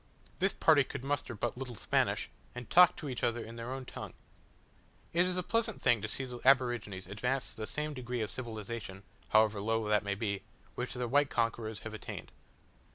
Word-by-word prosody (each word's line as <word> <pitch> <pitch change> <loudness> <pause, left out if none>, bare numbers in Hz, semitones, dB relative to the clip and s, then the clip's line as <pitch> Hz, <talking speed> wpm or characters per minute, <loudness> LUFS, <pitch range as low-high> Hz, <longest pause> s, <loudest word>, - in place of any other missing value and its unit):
This 195 +1 +2
party 155 -3 +6
could 130 - -7
muster 135 -3 -1
but 115 +2 -2
little 125 -3 -5
Spanish, - - +1 0.3
and 125 -1 -6
talked 180 0 +8
to 150 - -5
each 130 -3 -4
other 120 0 +1
in 115 - -9
their 115 +2 -5
own 130 0 -4
tongue. - - -7 1.0
It 175 +2 +4
is 185 0 -1
a 180 - 0
pleasant 230 +1 +1
thing 120 -3 +4
to 110 - -2
see 135 +5 -2
the 125 -1 -7
aborigines 120 -8 +3
advanced 125 +8 -2
to - - -15
the 110 0 -4
same 150 0 -2
degree 125 -2 -3
of 105 - -2
civilization, 110 -4 -5 0.3
however 110 -1 +4
low 110 +1 0
that 105 -1 +4
may 100 -1 -1
be, 100 -2 -2 0.3
which 125 +1 -4
their 125 -1 -1
white 140 +3 +3
conquerors 115 -2 -1
have 110 - -7
attained. 110 - -7
120 Hz, 200 wpm, -32 LUFS, 110-135 Hz, 1.0 s, talked